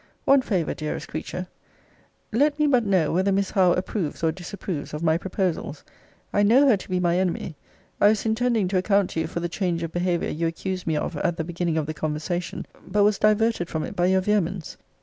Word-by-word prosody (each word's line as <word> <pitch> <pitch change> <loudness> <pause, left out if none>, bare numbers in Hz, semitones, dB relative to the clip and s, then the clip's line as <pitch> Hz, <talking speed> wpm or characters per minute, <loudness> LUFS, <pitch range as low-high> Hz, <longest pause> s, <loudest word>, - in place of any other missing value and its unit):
One 275 0 +6
favour, 185 -10 -1
dearest 155 -1 -5
creature 175 +3 -5 0.9
Let 290 +6 +2
me 300 - +2
but 255 -5 +3
know, 185 -7 +2
whether 190 +3 +2
Miss 195 0 0
Howe 185 -3 +4
approves 180 -4 -3
or 160 - +3
disapproves 175 -3 -6
of 150 - -5
my 160 -1 +3
proposals? 180 -4 -2 0.5
I 205 - +3
know 245 +8 +5
her 250 - +6
to 195 - -9
be 185 0 0
my 175 0 +2
enemy. 180 -3 -2 0.5
I - - +7
was 215 +1 +2
intending 225 -2 +1
to 190 -1 +2
account 200 0 +2
to - - -2
you 160 - -1
for 170 - -4
the 175 - -1
change 175 -1 -2
of 165 - -4
behaviour 175 0 0
you 165 +2 -1
accused 185 +2 -4
me 160 - +1
of 150 +1 -3
at 170 +2 -1
the 160 - -1
beginning 170 -1 -2
of 155 - 0
the 155 - -4
conversation; 155 +3 -3 0.2
but 205 +2 +2
was 205 0 +3
diverted 215 -3 +2
from 160 -1 -2
it - - -6
by 175 -1 +2
your 190 0 +3
vehemence. 190 -4 -1
180 Hz, 215 wpm, -24 LUFS, 165-205 Hz, 0.9 s, I